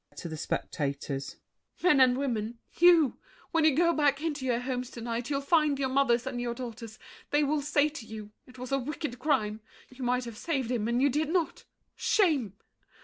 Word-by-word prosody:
[To - - -6
the 160 - -5
spectators.] 140 -2 -3 0.5
Men 350 -6 +5
and 255 -1 +5
women—you! 270 +6 +2 0.3
When 325 -1 +3
you 310 -4 +5
go 340 +2 +4
back 285 -3 +2
into 300 -4 -3
your 240 -2 +2
homes 250 -1 -3
to 235 - -9
night, 235 +1 -3
You'll 280 -1 0
find 300 -1 +3
your 270 -1 0
mothers 255 -3 +2
and 255 -2 -3
your 240 -1 -2
daughters; 230 -3 -7 0.3
they 295 +1 +3
Will 295 +1 +1
say 290 +1 +2
to 300 -6 -8
you, 215 -1 -8 0.2
"It 255 0 -15
was 250 +1 -7
a 275 - +2
wicked 280 -1 -5
crime. 220 -7 0 0.3
You 255 0 -8
might 250 0 0
have 230 -2 -8
saved 270 -8 -1
him, 225 -3 0
and 240 +2 +1
you 285 - +5
did 300 +3 0
not. 340 -1 -1 0.3
Shame!" 290 - +2
260 Hz, 195 wpm, -29 LUFS, 235-295 Hz, 0.5 s, Men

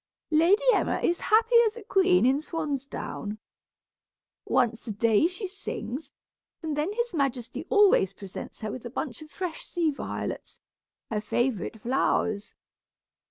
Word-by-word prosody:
Lady 335 +8 +4
Emma - - +1
is 345 - +1
happy 455 +2 +4
as 440 +2 -4
a 460 - -8
queen 375 -6 +4
in 265 +2 +4
swansdown. 280 -9 -4 1.1
Once 240 -2 +1
a - - -2
day 225 +6 +3
she 370 +4 -5
sings, 320 -7 -6 0.5
and 310 -2 -2
then 300 +6 0
his 475 -1 -2
majesty 270 -6 -2
always 405 - +5
presents 195 +2 -9
her 215 -1 -3
with 255 - -7
a 240 - -5
bunch 255 +1 -4
of 310 - -11
fresh 350 0 -5
sea 335 -3 0
violets, 280 - -5 0.5
her 210 -1 0
favorite 230 0 -1
flowers. 220 -3 0
290 Hz, 140 wpm, -27 LUFS, 235-360 Hz, 1.1 s, always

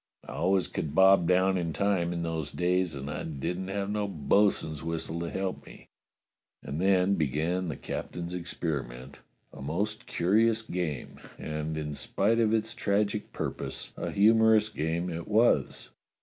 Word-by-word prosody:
I - - -7
always 95 +2 +1
could 75 -1 -4
bob 95 -2 +6
down 95 +1 +3
in 85 -2 -2
time 95 -1 +1
in 85 -1 -2
those 80 -3 -3
days, 90 -2 0
and 70 0 -6
I 75 - -4
didn't 90 +5 -4
have 100 0 -2
no 105 -1 -1
bo'sun's 80 -2 +1
whistle 85 0 -3
to 85 0 -3
help 95 -1 -3
me." - - -14 0.7
And 70 +5 -4
then 95 0 +3
began 80 +3 0
the 75 - -4
captain's 85 0 -5
experiment, 70 -7 -4 0.3
a - - -10
most 105 - -3
curious 110 +6 +2
game, 85 - -4 0.2
and, 75 0 -4
in 75 -1 -3
spite 105 +9 0
of 110 -2 +3
its 110 0 0
tragic 105 +1 0
purpose, - - -5
a - - -4
humorous 110 +1 +5
game 85 -1 -2
it 85 0 -5
was. 110 +3 +2
90 Hz, 155 wpm, -29 LUFS, 80-100 Hz, 0.7 s, bob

